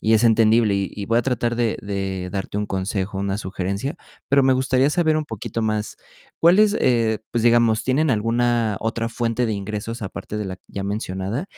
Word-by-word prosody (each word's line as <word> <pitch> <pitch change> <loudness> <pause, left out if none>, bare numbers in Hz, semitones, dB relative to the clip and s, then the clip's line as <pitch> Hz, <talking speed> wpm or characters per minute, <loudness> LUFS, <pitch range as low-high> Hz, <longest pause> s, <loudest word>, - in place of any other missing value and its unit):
y 110 - +3
es 110 +2 +3
entendible. 110 -1 +4
Y 100 -1 -1
y 100 - -5
voy 115 +1 +2
a - - +1
tratar 120 -2 0
de 115 -2 0
de 95 -2 -3
darte 100 0 -4
un 105 - -2
consejo, 95 0 -2
una 100 0 -1
sugerencia. 100 - -3 0.3
Pero 140 0 +4
me 135 0 +4
gustaría 130 +1 +2
saber, 160 -1 +2
un 155 - -4
poquito 115 -1 -5
más, 110 -1 -2 0.4
cuáles, 200 +5 +5
eh, 115 -3 +2
pues, 120 -1 -1
digamos, 115 -2 +4
¿tienen 140 +4 +2
alguna 115 -1 +1
otra 115 +1 -2
fuente 115 +1 -1
de 110 - 0
ingresos, 105 +3 -4
aparte 100 +1 -6
de 105 - -3
la 95 -1 -5
ya 100 - -6
mencionada? 100 - -3
110 Hz, 190 wpm, -22 LUFS, 100-120 Hz, 0.4 s, cuáles